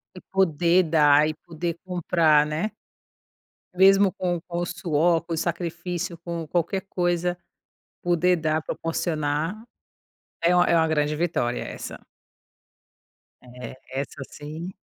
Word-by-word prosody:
E - - -8
poder 180 -1 +3
dar 150 -1 +5
e - - -2
poder 170 +1 -5
comprar, 165 -4 +3
né. 155 +8 -2 1.0
Mesmo 195 +1 +5
com 175 -2 -2
com 170 0 -3
o 175 - -1
suor, 170 -1 +1
com 170 - -6
o - - -2
sacrifício, 170 +1 -3
com 170 -1 -5
qualquer 175 +4 0
coisa, 175 0 0 0.7
poder 175 +1 +3
dar, 155 -1 0
proporcionar, 160 +1 -2 0.9
é 175 +1 +4
uma 175 - +5
é - - +3
uma 160 -1 +4
grande 150 -1 +1
vitória, 150 -7 -1
essa. - - -7 1.4
É, 125 -1 -10 0.2
essa 140 +1 -4
sim. 155 +4 -7
170 Hz, 125 wpm, -25 LUFS, 155-175 Hz, 1.4 s, dar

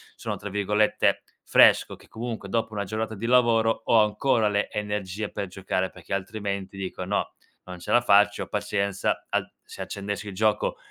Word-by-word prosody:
sono, - - -4
tra 105 - -7
virgolette, 105 +1 +1 0.2
"fresco", - - +5
che - - -20
comunque 115 -3 -6
dopo 115 0 -1
una 100 -1 -2
giornata 110 +2 -3
di 110 +2 -4
lavoro 115 -2 +3
ho 115 - +5
ancora 110 +1 +2
le 105 0 0
energie 105 0 -3
per 100 - -4
giocare, 95 0 -2
perché 90 +1 -15
altrimenti 100 0 -4
dico: 95 -1 -5
"No, - - -1 0.3
non 90 -1 -8
ce 85 - -6
la 120 - +6
faccio, 105 -3 +4
pazienza, 100 -1 -1
al - - -1
se - - -10
accendessi 100 +1 -5
il 100 - -6
gioco 105 +2 +1
105 Hz, 170 wpm, -26 LUFS, 100-110 Hz, 0.3 s, la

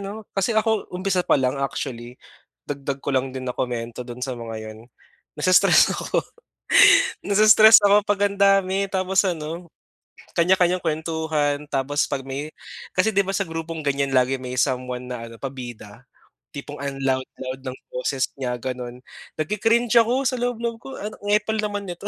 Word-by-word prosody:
'no? 210 +2 -7
Kasi, 195 +4 0
ako 220 0 +1
umpisa 185 0 0
pa - - +4
lang 130 +1 0
actually, 125 -3 -4 0.5
dagdag 140 -1 -4
ko - - -2
lang 130 0 0
din 130 - -5
na 125 - -4
komento 120 -1 -3
do'n 125 0 -9
sa 130 - -4
mga 115 -1 -6
'yon, 110 - -12 0.6
nai-stress 185 +4 +5
ako - - -1 1.0
nai-stress 215 +2 +7
ako 205 +1 +5
pag 205 -1 0
ang 200 - -9
dami 195 0 +3
tapos 190 0 +1
ano 165 0 -4 0.7
kanya-kanyang 180 +1 +3
kuwentuhan 155 -2 -1
tapos 145 +2 0
'pag 135 -2 -2
may 140 +3 -5 0.5
kasi 215 +4 +3
'di 200 - +4
ba, 195 - -2
sa 200 - 0
grupong 165 0 -5
ganyan 140 -1 0
lagi 130 +1 +3
may 125 0 -6
someone 125 -2 -1
na 115 -2 -5
ano 115 - -11
pabida 120 -6 -8 0.5
tipong - - -8
ang 140 -1 -4
loud, 130 -1 +1 0.2
loud 130 0 -6
ng 130 0 -5
boses 130 +1 -1
niya 125 -2 -2
gano'n, 125 -1 -6 0.4
nagki-cringe 225 +8 +1
ako 245 +4 0
sa 255 - 0
loob, 245 -1 -1
loob 230 -1 -3
ko 270 - -8
ano, 210 +1 -6
"ang 205 - -2
epal 220 +1 0
naman 205 -2 -3
nito." 175 +3 -6
155 Hz, 170 wpm, -23 LUFS, 130-200 Hz, 1.0 s, nai-stress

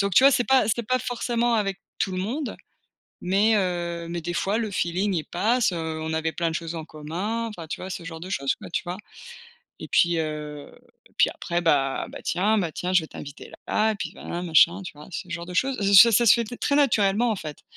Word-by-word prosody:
Donc 200 -1 0
tu 260 - +7
vois? 275 - +9
C'est 245 -2 +2
pas 265 -1 +4
c'est 235 +2 0
pas 255 0 +2
forcément 240 -1 -1
avec 195 -3 -1 0.2
tout 195 - 0
le 185 - -3
monde 250 +9 -3 0.7
mais 205 +4 +3
heu, 175 -3 -2
mais 170 0 -3
des 175 +2 -4
fois 200 +5 0
le 220 -2 -2
feeling 190 +2 -1
il 160 - -1
passe. 220 +4 +1
Heu, 160 -2 -4
on 160 0 -3
avait 160 0 -1
plein 170 -1 0
de 160 - -4
choses 165 -1 -4
en 160 -1 -6
commun, 185 +11 -4
enfin 175 -7 -8
tu - - -5
vois? 185 - -6
Ce 180 - -6
genre 165 -1 -7
de 185 +3 -8
chose 140 -6 0
quoi, - - -11
tu 170 +1 -2
vois? 175 +1 -5 0.8
Et - - -8
puis, 170 -1 +3
heu, 150 -2 -5 0.4
et - - -31
puis - - +5
après 175 0 -3
bah: 140 -5 +1
«Bah, - - -9
tiens 210 +5 +1
bah, 170 -5 -1
tiens 180 +1 -3
je 180 - +5
vais 160 - -7
t'inviter 145 0 -10 0.2
là 215 +1 +2
et - - -5
puis - - -5
voilà, 175 - -6
machin», 170 +2 +4
tu - - -7
vois? 150 +1 -13
Ce 180 - -6
genre 170 0 -5
de 180 - -8
chose 265 +6 +1 0.2
ça 235 -1 +8
ça 235 +3 +4
se 210 - +8
fait 235 -1 0
t 245 +3 -8
très 280 - +1
naturellement 230 -4 +3
en - - -3
fait. 155 -4 -8
180 Hz, 245 wpm, -25 LUFS, 165-220 Hz, 0.8 s, vois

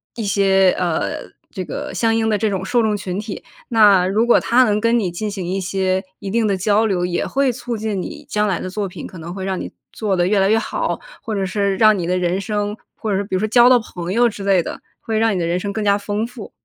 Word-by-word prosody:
一 230 - -4
些， 195 -2 +3
呃， 175 -3 -2 0.2
这 185 - -5
个 290 +8 -5
相 225 -1 +2
应 225 0 +1
的 210 - +2
这 215 +1 0
种 190 -1 -2
受 235 +4 +1
众 215 -1 +1
群 190 -1 -4
体。 210 -1 -6 0.3
那 205 -5 +5
如 215 +5 +1
果 240 - +6
他 250 +2 +4
能 210 -2 +1
跟 230 +2 +2
你 190 -4 -1
进 205 +5 -4
行 190 -4 -5
一 190 +2 -1
些 190 0 -1 0.2
一 195 - -6
定 225 +2 +1
的 200 -2 +1
交 210 +3 +2
流， 180 -4 0
也 175 - -1
会 275 -1 +1
促 240 0 -5
进 215 -3 -2
你 305 - -6
将 210 -3 +1
来 190 - 0
的 185 - -5
作 200 +1 -3
品， 180 -3 -8
可 185 - -12
能 170 +2 -7
会 190 -1 -5
让 190 -1 -2
你 - - -6 0.2
做 210 -3 -1
得 175 -1 +2
越 205 +1 +2
来 195 +1 +3
越 225 +1 +4
好， - - -2 0.2
或 220 - -4
者 195 -1 -1
是 200 +1 0
让 215 -1 +5
你 175 - -2
的 180 0 +1
人 180 +1 0
生， 205 +1 -2 0.2
或 220 - -5
者 190 - +1
是 200 - -1
比 195 - -4
如 - - +1
说 215 - 0
交 240 +2 +6
到 250 - +6
朋 180 -5 -6
友 240 +2 +4
之 205 -2 -8
类 195 -3 +3
的， - - -7 0.2
会 220 -1 -2
让 225 -2 +2
你 - - -1
的 170 - 0
人 175 +1 0
生 200 +1 -3
更 215 - -2
加 200 0 +3
丰 205 +2 -2
富。 240 -3 -10
205 Hz, 295 characters per minute, -20 LUFS, 185-220 Hz, 0.3 s, 果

